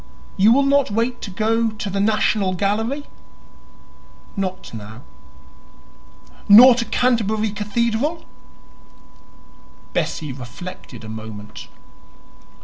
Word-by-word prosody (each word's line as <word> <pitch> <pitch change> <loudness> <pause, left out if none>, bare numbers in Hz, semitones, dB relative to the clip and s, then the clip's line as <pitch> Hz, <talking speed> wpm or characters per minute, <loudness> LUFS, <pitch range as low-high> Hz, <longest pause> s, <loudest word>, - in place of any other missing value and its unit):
"You 205 +4 +5
will 275 +3 +4
not 280 -1 +3
wait 230 +4 -1
to - - -6
go 225 +3 0
to 210 -1 -6
the 195 - -2
National 205 -2 +1
Gallery?" 225 +9 -1 1.3
"Not 190 - -4
now." 110 +2 -10 1.5
"Nor 245 +5 +10
to 235 -1 -2
Canterbury 220 -4 0
Cathedral?" 235 +9 -2 1.7
Bessie 150 -4 -2
reflected 125 - -10
a - - -9
moment. 110 -1 -9
210 Hz, 95 wpm, -21 LUFS, 185-235 Hz, 1.7 s, Nor